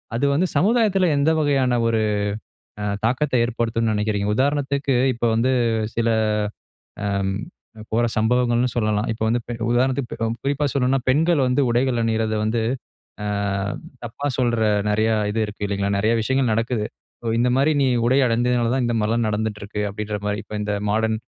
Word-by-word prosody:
அது 125 +5 +1
வந்து 175 +6 +2
சமுதாயத்தில 200 0 +3
எந்த 140 +2 +3
வகையான 135 -5 +2
ஒரு 115 -1 +1 0.8
அ - - -2 0.2
தாக்கத்த 130 +5 0
ஏற்படுத்தும்ன்னு 115 -1 0
நினைக்கிறீங்க? 105 -1 -1
உதாரணத்துக்கு 140 +1 0 0.2
இப்போ 120 0 -2
வந்து 120 +3 +2 0.4
சில 115 0 +1 1.0
அம் 100 -1 0 0.6
போற 120 +2 +2
சம்பவங்கள்ன்னு 120 +2 +2
சொல்லலாம். 105 -1 +1
இப்போ 110 - -6
வந்து 120 +2 +1 0.3
உதாரணத்துக்கு 130 +1 +1
ப் - - -3 0.2
குறிப்பா 140 +1 0
சொல்லணும்ன்னா, 135 0 +1
பெண்கள் 160 +3 +3
வந்து 125 +3 +2
உடைகள் 120 0 +1
அணியிறத 110 -1 0
வந்து, 110 +1 0 0.6
ஆ - - -2 0.8
தப்பா 120 +5 -5
சொல்ற 120 -2 +1 0.3
நிறைய 110 +2 +2 0.2
இது 110 - -2
இருக்குது 105 0 -5
இல்லைங்களா? 100 0 -1
நிறைய 110 +3 +2
விஷயங்கள் 130 +2 +1
நடக்குது. 115 -1 -1 0.5
"இந்த 125 +1 +2
மாதிரி 140 +4 +3
நீ - - +3 0.2
உடை 130 +3 +3
அணிஞ்சதுனால 120 0 +1
தான் 130 -2 +1
இந்த 120 - 0
மாரிலாம் 115 +2 +1
நடந்துட்டு 105 0 -2
இருக்குது, 105 +1 -3
அப்படிங்கிற 105 0 -4
மாதிரி 105 0 -1
இப்ப - - -9
இந்த 105 0 -1 0.2
மாடர்ன் 110 +1 +1
120 Hz, 150 wpm, -22 LUFS, 110-130 Hz, 1.0 s, சமுதாயத்தில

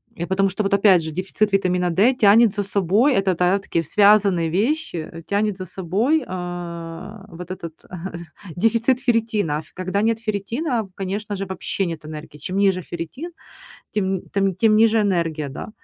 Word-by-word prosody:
Э, 170 - -4
потому 195 +1 +2
что, 190 +3 -3
вот 195 - -1
опять 195 -3 +5
же, 160 - -5
дефицит 190 +5 -1
витамина 180 -2 +1
D 200 +10 +3
тянет 220 -2 +5
за 205 - 0
собой- 200 - +3
это, 195 -2 +1
да, 180 +3 +2
такие 170 -3 -2
связанные 200 -1 +4
вещи, 235 - -1
э, 165 0 -10
тянет 205 +2 -1
за 185 - -6
собой, 200 - 0
а, 175 +2 -7
вот 175 0 -10
этот, 170 -3 -8
э, - - -22 0.7
дефицит 230 +6 +2
ферритина. 225 - 0
А, - - -3
ф 155 - -13
когда 185 +2 -2
нет 225 0 +1
ферритина, 225 - -2
конечно 200 +2 -4
же, 195 0 -4
вообще 190 +1 -2
нет 165 -2 -6
энергии. 155 0 -9
Чем 185 +6 -4
ниже 195 -2 +2
ферритин, 215 - -7 0.6
тем 190 -2 -1
тем, 195 -1 +1
тем 215 +1 +4
ниже 225 +1 +4
энергия, 165 -7 0
да. 135 - -7
195 Hz, 175 wpm, -22 LUFS, 175-215 Hz, 0.7 s, опять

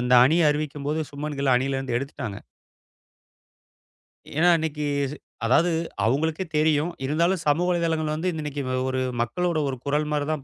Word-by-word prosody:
அந்த 125 +1 0
அணிய 160 +2 +4
அறிவிக்கும் 150 -1 -3
போது 155 +2 0
சுப்மன் 145 0 -5
கில்ல 135 -3 +4
அணியிலிருந்து 135 -1 -1
எடுத்துட்டாங்க. 130 -6 -6 2.0
ஏன்னா 175 +2 +5
இன்னைக்கு 150 -2 -2 0.6
அதாவது 160 +9 +4 0.4
அவங்களுக்கே 155 +9 0
தெரியும். 155 +1 +2 0.2
இருந்தாலும் 170 +5 +1
சமூக 165 +5 +3
வலைத்தளங்கள் 165 -3 0
வந்து 170 +4 -1
இன்னைக்கு 150 -2 -4 0.3
ஒரு 130 0 -1 0.2
மக்களோட 175 +7 -1
ஒரு 135 - -2
குரல் 150 +2 0
மாதிரி 145 -1 0
தான் 155 -3 -3
150 Hz, 140 wpm, -25 LUFS, 140-160 Hz, 2.0 s, ஏன்னா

